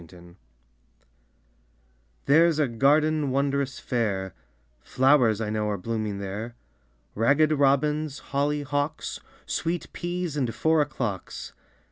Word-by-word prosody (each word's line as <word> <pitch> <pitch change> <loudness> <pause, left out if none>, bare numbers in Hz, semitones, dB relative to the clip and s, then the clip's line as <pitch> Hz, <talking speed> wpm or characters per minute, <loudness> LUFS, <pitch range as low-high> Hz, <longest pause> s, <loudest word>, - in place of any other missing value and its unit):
A - - -11
GARDEN 85 +1 -16 1.9
There's 160 +3 +5
a 150 -2 +2
garden 145 +5 +2
wondrous 140 0 0
fair, 100 -6 -2 0.5
Flowers 130 - +3
I 110 -2 -2
know 105 -1 -1
are 105 - -1
blooming 110 0 -3
there, 100 +4 -5 0.6
Ragged 140 +8 +3
Robins, 150 +1 +1 0.2
Holly 145 +1 0
Hocks, 145 +2 -3 0.3
Sweet 170 +1 -3
Peas 175 -2 -3
and 125 -6 -1
Four 160 -1 +3
o'clocks. 120 -9 -4
135 Hz, 110 wpm, -26 LUFS, 110-150 Hz, 1.9 s, There's